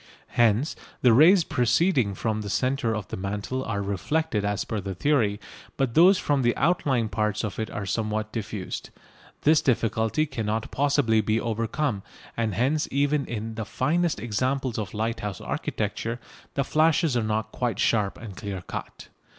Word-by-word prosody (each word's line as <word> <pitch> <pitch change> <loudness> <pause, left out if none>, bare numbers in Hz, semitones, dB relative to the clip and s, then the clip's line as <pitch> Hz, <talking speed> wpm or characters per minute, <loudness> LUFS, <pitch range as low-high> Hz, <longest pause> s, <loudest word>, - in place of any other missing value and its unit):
Hence 120 +5 +2 0.3
the 125 -3 +7
rays 165 - +7
proceeding 125 - +2
from 110 0 -1
the 100 - -5
centre 125 0 0
of 105 -4 -5
the - - -4
mantle 105 +7 -3
are 100 -4 -2
reflected 105 - -1
as 100 -1 -1
per 110 - -3
the 95 0 -5
theory, 110 -4 +1 0.4
but 135 -4 0
those 180 +6 +7
from 145 -5 +1
the 120 -1 +1
outlying 140 -8 +2
parts 105 +1 -1
of 105 -1 -4
it 110 - -2
are 105 -3 -4
somewhat 110 +2 -2
diffused. 105 -4 -5 0.5
This 155 +1 +5
difficulty 115 +3 +1
cannot 110 -6 -3
possibly 140 -6 +2
be 110 +2 +1
overcome, 115 +1 -1 0.3
and 110 -4 -1
hence 140 +8 +1
even 140 +1 +1
in 115 -1 -4
the 110 0 -4
finest 155 - 0
examples 125 +3 -1
of 105 0 -5
lighthouse 105 -3 -2
architecture 115 +2 -3 0.4
the 140 - +2
flashes 160 0 +2
are 120 - +2
not 110 0 -1
quite 120 -5 -2
sharp 105 -4 +1
and 105 -4 -9
clear 95 -3 -5
cut. - - -8
115 Hz, 160 wpm, -26 LUFS, 105-140 Hz, 0.5 s, the